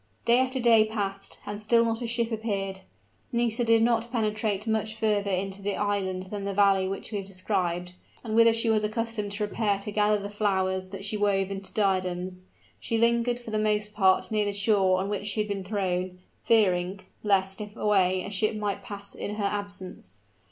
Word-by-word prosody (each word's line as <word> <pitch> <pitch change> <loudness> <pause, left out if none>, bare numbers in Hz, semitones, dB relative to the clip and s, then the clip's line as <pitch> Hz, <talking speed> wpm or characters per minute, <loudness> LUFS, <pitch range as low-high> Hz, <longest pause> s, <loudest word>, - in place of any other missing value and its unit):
Day 235 +1 +5
after 260 0 0
day 230 -3 +6
passed, 200 -2 -4
and 205 0 -5
still 230 +2 +4
not 225 +1 -1
a 240 - -2
ship 235 0 0
appeared. 200 -4 -2 0.5
Nisida 235 -1 0
did 225 0 +5
not 235 0 +1
penetrate 215 -3 -1
much 220 -1 -1
further 210 -2 0
into 195 +1 -2
the 200 0 -1
island 190 -2 -2
than 205 -1 -4
the 200 0 -3
valley 195 -2 +4
which 195 +3 -5
we 205 - -2
have 195 - -7
described, 180 -2 -2 0.3
and 220 -2 -4
whither 230 0 +7
she 225 +1 0
was 220 -1 +2
accustomed 215 -1 -2
to 210 +1 -1
repair 205 -1 0
to 200 +1 -5
gather 210 0 +3
the 200 0 -5
flowers 190 -2 0
that 195 0 -7
she 210 +1 -1
wove 200 -2 +1
into 195 -1 -5
diadems. 185 -2 -1 0.4
She 230 - -1
lingered 235 +1 +2
for 240 -2 -9
the 215 - 0
most 210 0 +1
part 190 0 +3
near 210 -1 +1
the 205 - -1
shore 200 -2 +3
on 190 - -2
which 205 0 -3
she 210 - -1
had 210 - 0
been 200 -2 -3
thrown, 185 -2 -2 0.2
fearing 190 -4 +2 0.2
lest, 195 -1 +1
if 210 0 -8
away, 185 -4 +2
a 200 - -6
ship 215 +2 +1
might 205 -2 -2
pass 200 -1 -7
in 205 - -5
her 210 - -3
absence. 200 - -4
205 Hz, 200 wpm, -27 LUFS, 195-220 Hz, 0.5 s, whither